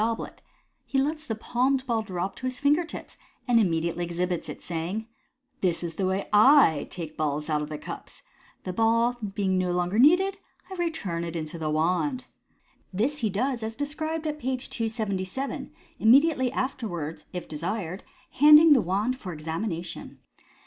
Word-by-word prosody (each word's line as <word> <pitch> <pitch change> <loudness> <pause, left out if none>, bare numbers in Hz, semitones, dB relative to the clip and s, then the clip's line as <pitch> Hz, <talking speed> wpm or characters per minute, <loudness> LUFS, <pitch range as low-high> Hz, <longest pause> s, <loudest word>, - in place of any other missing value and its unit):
281 225 +1 +1
goblet, - - -18 0.4
he 270 - -2
lets 305 +3 -1
the 225 - -2
palmed 255 +4 0
ball 230 -3 0
drop 190 -2 -4
to 255 - -4
his 255 -1 -4
finger 290 +4 +3
tips, 330 - -9 0.3
and 240 -2 +5
immediately 170 -3 0
exhibits 175 0 -2
it, - - -8
saying 180 +6 -3
— - - -44
" 265 0 -45
This 175 -2 +1
is 170 -1 -4
the 185 +3 -1
way 190 +1 -1 0.6
/ - - -23
take 165 -4 -6
the - - -26
balls 150 0 -1
out 150 -1 +1
of 150 - -5
the 155 - -4
cups. - - -9 0.4
The 185 - -4
ball 230 +3 +3 0.2
being 190 -2 +1
no 180 -1 0
longer 180 +4 0
needed, 370 +8 +5 0.3
I - - -4
return 320 - -2
it 170 0 -5
into 160 0 -4
the 155 -1 -2
wand.'* 180 - 0 0.7
This 245 +10 0
he 220 - 0
does 240 +5 -1
as 220 0 -4
described 310 +3 -3
at 300 -1 -3
page 255 -1 -3
277, 220 +1 -3 0.3
immediately 260 +2 +5
afterwards, 175 - -4
if 180 -2 -6
desired, 175 +3 -4 0.3
handing 300 +2 +8
the 260 - +4
wand 205 +9 -1
for 185 - -6
examination. 165 +2 -5
220 Hz, 175 wpm, -26 LUFS, 175-260 Hz, 0.7 s, handing